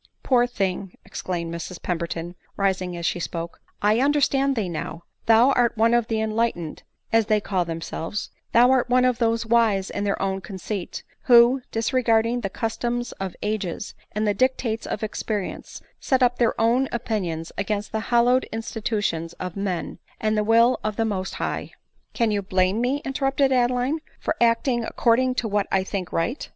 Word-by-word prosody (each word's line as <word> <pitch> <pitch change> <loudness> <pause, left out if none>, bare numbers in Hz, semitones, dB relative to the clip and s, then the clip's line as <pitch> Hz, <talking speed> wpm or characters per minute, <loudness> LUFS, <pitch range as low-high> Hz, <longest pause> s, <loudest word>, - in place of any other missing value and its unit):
" - - -47
Poor 245 -2 +3
thing," 195 -5 -3
exclaimed 170 -2 -4
Mrs 170 +1 -6
Pemberton, 170 0 -3 0.2
rising 185 -3 0
as 170 - -4
she 175 - 0
spoke, 170 0 -5
" - - -43
I 210 +2 +4
understand 275 0 +2
thee 215 -5 -1
now 170 0 -5
— - - -44
Thou 230 +4 +6
art 240 -3 +2
one 230 +2 +4
of 240 -2 +2
the 225 -2 -1
enlightened, 220 -7 -1 0.3
as 225 -2 +4
they 215 -1 +3
call 190 -3 -1
themselves 165 +3 -4
— - - -48
Thou 245 +2 +6
art 255 -2 +2
one 250 0 +4
of 250 -1 +1
those 230 -1 +1
wise 220 -4 +2
in 205 - -3
their 200 -1 0
own 195 0 -1
conceit, 190 -1 -5 0.2
who, 245 +1 +6
disregarding 230 0 +1
the 195 - -2
customs 240 +2 -2
of 190 -2 -4
ages, 205 -3 -3 0.2
and 215 +1 0
the 205 - +3
dictates 230 -1 0
of 210 - -3
experience, 210 -2 -4 0.2
set 260 -1 +2
up 245 0 +2
their 235 -2 +2
own 240 +4 +3
opinions 180 -9 -3
against 205 0 -2
the 220 - -1
hallowed 245 +2 +4
institutions 210 -7 -3
of 180 -2 -6
men 195 -4 -3 0.2
and 215 0 +1
the 210 - +2
will 230 +3 +4
of 215 -1 -2
the 225 - 0
Most 190 -3 -3
High." - - -3 0.2
" - - -43
Can 230 -2 +2
you 205 -1 0
blame 190 +2 +1
me," 270 +4 0
interrupted 270 0 +1
Adeline, 250 +4 +1
" - - -32
for - - -1
act 230 +2 +3
ing 240 -3 +1
according 250 +3 +2
to 240 - -1
what 205 -1 0
I 190 -1 +2
think 190 -1 -4
right 205 - -2
220 Hz, 190 wpm, -24 LUFS, 190-240 Hz, 0.3 s, Thou